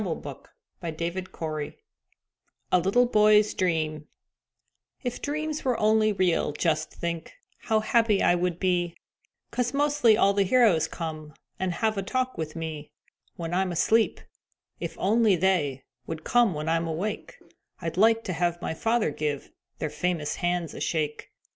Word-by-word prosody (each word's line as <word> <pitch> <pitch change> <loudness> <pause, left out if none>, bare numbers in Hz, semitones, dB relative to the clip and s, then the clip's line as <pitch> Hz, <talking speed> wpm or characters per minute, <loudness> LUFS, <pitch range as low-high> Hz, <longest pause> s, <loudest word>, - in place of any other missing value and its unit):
_ 160 -8 -5 2.2
A - - +6
LITTLE 195 +8 +3
BOY'S 210 -2 +4
DREAM 155 -4 -1 1.0
If 245 -2 -3
dreams 305 +1 -3
were 250 -3 0
only 215 0 +3
real, 185 -6 +1
just 155 0 0
think 170 -1 -5 0.3
How 220 -1 +1
happy 220 -2 +2
I - - +5
would 175 -1 -1
be, 175 -2 0 0.5
'Cause 250 +1 -1
mostly 285 -6 +4
all 200 -3 +4
the 200 - +2
heroes 200 -5 +4
come 155 -2 -6 0.2
And 185 -1 -1
have 220 +3 0
a - - 0
talk 255 +6 -1
with 155 -1 -5
me 160 -2 -5 0.5
When 170 0 -5
I'm 185 0 +1
asleep; 220 +6 +2 0.6
if - - -5
only 215 0 +3
they 160 -7 +1 0.2
Would 160 -1 -5
come 240 -8 +3
when 150 +1 -4
I'm 165 +1 +1
awake, 205 - -4 0.4
I'd 165 -2 -4
like 225 +4 +4
to 185 - -3
have 175 0 0
my 175 - -3
father 225 +1 +1
give 145 -1 -3 0.3
Their 155 - -3
famous 160 -2 -2
hands 175 -3 -1
a - - -8
shake. 150 -2 -2
180 Hz, 145 wpm, -27 LUFS, 160-220 Hz, 2.2 s, A